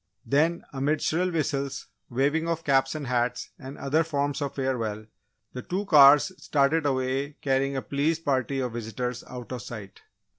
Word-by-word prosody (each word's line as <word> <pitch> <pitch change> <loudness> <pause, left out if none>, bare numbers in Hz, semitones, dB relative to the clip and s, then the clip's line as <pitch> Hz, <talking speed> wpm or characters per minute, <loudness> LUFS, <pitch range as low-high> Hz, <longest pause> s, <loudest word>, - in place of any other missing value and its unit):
Then, 160 +5 +2
amid 140 +3 0
shrill 180 +3 +1
whistles, 140 -4 -2 0.2
waving 145 +6 +1
of 165 0 -2
caps 135 0 +2
and 150 -2 -4
hats, 125 -1 -1
and 135 0 -9
other 150 +4 +1
forms 145 -3 -1
of 140 -2 -3
farewell, 115 -6 -2 0.5
the 125 - -5
two 190 +9 -3
cars 145 0 +7
started 145 +2 +2
away 135 +2 -1
carrying 135 0 +1
a 135 - -2
pleased 155 +7 -1
party 135 0 0
of 125 -3 -3
visitors 120 +2 -4
out 125 -1 -8
of 125 -2 -4
sight. 110 -5 -9
140 Hz, 160 wpm, -26 LUFS, 125-150 Hz, 0.5 s, cars